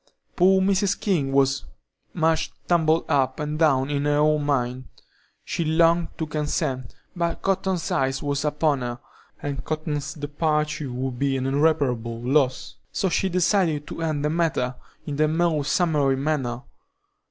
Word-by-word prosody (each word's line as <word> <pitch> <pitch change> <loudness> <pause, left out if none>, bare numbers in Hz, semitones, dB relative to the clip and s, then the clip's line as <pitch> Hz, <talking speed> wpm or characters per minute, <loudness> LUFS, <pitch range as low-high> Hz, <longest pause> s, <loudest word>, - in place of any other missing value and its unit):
Poor 190 +1 +5
Mrs. 195 0 +1
King 160 -10 0
was 135 - +2 0.5
"much 160 -1 +1 0.2
tumbled 165 -2 +3
up 140 0 +1
and 150 0 -3
down 140 -3 +3
in 145 0 -1
her 145 0 +2
own 150 0 +3
mind;" 130 -3 -1 0.6
she 170 - -2
longed 165 +2 +3
to 160 - -2
consent, 140 -5 -2 0.2
but 170 -1 -2
Cotton's 190 -3 0
eye 135 0 +2
was 140 0 -1
upon 150 -2 +1
her, 120 0 -4 0.4
and 140 -2 -3
Cotton's 155 -2 -3
departure 150 -1 -1
would 125 0 -4
be 140 -1 +1
an 130 - -2
irreparable 135 -5 +1
loss, 130 +2 0
so 190 - 0
she 190 +2 +1
decided 175 -4 +1
to - - -7
end 155 -3 -1
the 150 - +1
matter 160 -7 0 0.3
in 145 -2 -4
the 155 0 +3
most 155 -2 +1
summary 150 -6 +2
manner. 135 -4 -2
150 Hz, 150 wpm, -24 LUFS, 135-165 Hz, 0.6 s, Poor